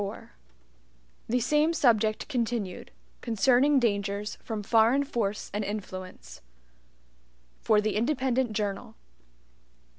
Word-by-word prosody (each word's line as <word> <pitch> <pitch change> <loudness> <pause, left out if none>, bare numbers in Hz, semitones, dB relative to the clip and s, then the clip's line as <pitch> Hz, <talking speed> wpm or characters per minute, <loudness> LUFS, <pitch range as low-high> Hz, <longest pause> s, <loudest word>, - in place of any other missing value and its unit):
4 200 0 -7 1.0
The 245 +2 +2
Same 300 +6 +2
Subject 220 -8 +2
Continued 230 -8 -3 0.3
(Concerning 250 +5 +3
Dangers 205 -2 -1
From 220 -3 -5
Foreign 230 +6 +3
Force 215 -7 -3
and 210 +1 -1
Influence) 185 - -7 1.2
For 215 - +3
the 215 0 -1
Independent 255 0 0
Journal. 205 -2 -3
220 Hz, 95 wpm, -27 LUFS, 205-250 Hz, 1.2 s, Concerning